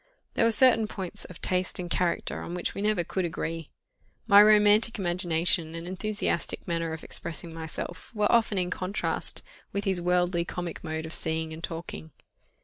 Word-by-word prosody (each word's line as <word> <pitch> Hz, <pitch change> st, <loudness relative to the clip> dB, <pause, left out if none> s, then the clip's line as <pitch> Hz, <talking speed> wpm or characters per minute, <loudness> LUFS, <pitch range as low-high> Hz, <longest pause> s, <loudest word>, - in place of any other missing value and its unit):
There -, -, +3 dB
were 230 Hz, -, +4 dB
certain 225 Hz, -1 st, +5 dB
points 190 Hz, -4 st, -4 dB
of 180 Hz, -, -11 dB
taste 185 Hz, 0 st, 0 dB
and 180 Hz, -, -4 dB
character 175 Hz, 0 st, -1 dB
on 175 Hz, -, -5 dB
which 180 Hz, -, -2 dB
we -, -, -5 dB
never 210 Hz, -4 st, +1 dB
could 190 Hz, +3 st, -2 dB
agree; 165 Hz, -1 st, -4 dB, 0.6 s
my 205 Hz, -2 st, +8 dB
romantic 210 Hz, +2 st, +5 dB
imagination 175 Hz, -2 st, +1 dB
and 165 Hz, +1 st, -6 dB
enthusiastic 200 Hz, 0 st, -2 dB
manner 165 Hz, -1 st, -1 dB
of 160 Hz, -, -7 dB
expressing 170 Hz, 0 st, -2 dB
myself, 165 Hz, +1 st, -6 dB
were 210 Hz, -1 st, +2 dB
often 225 Hz, -3 st, +3 dB
in 180 Hz, -1 st, 0 dB
contrast 185 Hz, +3 st, -2 dB, 0.3 s
with 200 Hz, -, -2 dB
his 190 Hz, -3 st, +1 dB
worldly 175 Hz, 0 st, +2 dB
comic 175 Hz, -1 st, -5 dB
mode 160 Hz, -1 st, -3 dB
of 160 Hz, -, -5 dB
seeing 160 Hz, -1 st, -1 dB
and 160 Hz, +1 st, -9 dB
talking. 165 Hz, -1 st, -6 dB
175 Hz, 170 wpm, -28 LUFS, 165-205 Hz, 0.6 s, my